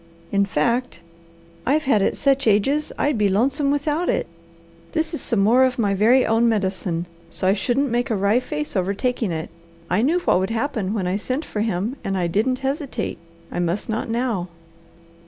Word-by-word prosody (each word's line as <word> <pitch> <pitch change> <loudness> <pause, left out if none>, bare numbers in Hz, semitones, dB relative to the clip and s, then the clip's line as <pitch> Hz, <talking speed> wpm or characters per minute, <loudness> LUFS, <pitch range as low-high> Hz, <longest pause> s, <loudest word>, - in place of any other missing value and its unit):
In 200 0 +2
fact, 230 +6 0 0.6
I've 300 +4 +2
had 265 -8 +3
it - - +1
such 275 -2 +2
ages 270 +9 +2
I'd 285 -5 +1
be 205 -1 +3
lonesome 270 +8 +1
without 295 +4 0
it. - - +1 0.7
This 320 0 -1
is 320 - -3
some 225 -6 0
more 235 +6 +5
of 255 -1 +1
my 205 -4 +1
very 230 +6 +4
own 225 +1 +3
medicine, 190 -5 -1 0.2
so 175 - -4
I 190 - +5
shouldn't 245 +6 0
make 245 +2 0
a 225 - +1
wry 200 +4 +3
face 300 +2 -4
over 190 +1 0
taking 245 -3 -1
it. 160 -1 -4 0.4
I 185 - +3
knew 305 +8 +3
what 180 - +3
would 190 +1 -1
happen 225 -4 -1
when 195 -4 -1
I 180 +2 0
sent 255 +8 -3
for 210 - -3
him, 220 +4 -1
and 195 0 -1
I 180 - 0
didn't 220 +9 +1
hesitate. 280 0 -3 0.3
I - - -3
must 175 +6 -1
not 225 +1 -2
now. 230 -6 -1
225 Hz, 195 wpm, -22 LUFS, 195-270 Hz, 0.7 s, more